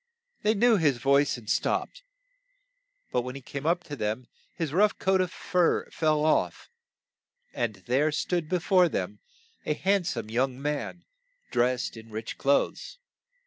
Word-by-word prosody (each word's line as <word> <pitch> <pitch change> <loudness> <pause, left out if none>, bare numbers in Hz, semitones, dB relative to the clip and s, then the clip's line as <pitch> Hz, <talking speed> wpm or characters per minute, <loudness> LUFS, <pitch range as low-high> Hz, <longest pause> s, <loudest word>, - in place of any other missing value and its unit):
They 215 +1 +2
knew 230 +1 +5
his 145 -7 +2
voice 140 +1 +3
and 115 -3 -13
stopped, - - -1 1.1
but 125 - +1
when 125 +1 -6
he 135 - -7
came 140 +3 -5
up 175 +1 +2
to 145 -3 -7
them, 110 +1 -2 0.3
his 160 -4 -3
rough 205 +4 +3
coat 190 0 +2
of 180 -1 -1
fur 180 -2 +1
fell 155 -1 +1
off, 155 - 0 0.8
and 110 -3 -1
there 140 +5 +2
stood 160 +1 -1
be 185 - +2
fore 180 0 +4
them - - -3 0.4
a 150 - -1
hand 195 +1 +1
some 115 -8 -3
young 130 +2 0
man, 150 +4 -3 0.5
dressed 125 0 +1
in 110 0 -11
rich 110 0 -6
clothes. 140 - 0
150 Hz, 155 wpm, -27 LUFS, 125-180 Hz, 1.1 s, knew